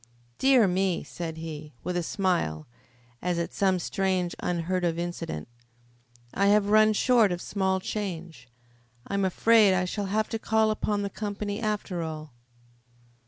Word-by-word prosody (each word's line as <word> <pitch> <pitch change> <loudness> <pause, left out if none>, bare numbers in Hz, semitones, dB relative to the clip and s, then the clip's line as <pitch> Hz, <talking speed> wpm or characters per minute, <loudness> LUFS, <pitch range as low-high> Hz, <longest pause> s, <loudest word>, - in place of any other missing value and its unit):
"Dear 260 -5 +5
me!" 185 -1 0
said 165 -2 -6
he, 155 -3 -7
with 180 - -3
a 175 - +1
smile, 170 - -1 0.6
as 180 -1 -1
at 170 - -3
some 190 -2 +2
strange, 185 -1 -1
unheard 180 +1 -1
of 165 -1 0
incident. 170 - -4 0.9
"I 200 - +2
have 205 0 +4
run 215 0 +6
short 230 -2 +4
of 175 - -2
small 190 0 0
change. 175 - -5 0.6
I - - -7
am 200 0 +1
afraid 210 +1 +5
I 185 0 +1
shall 200 +2 -3
have 215 +2 0
to 225 - -3
call 220 0 +2
upon 210 -1 -1
the 200 - -3
company, 205 0 -4
after 210 -5 -2
all." 155 -3 -6
190 Hz, 155 wpm, -27 LUFS, 170-210 Hz, 0.9 s, run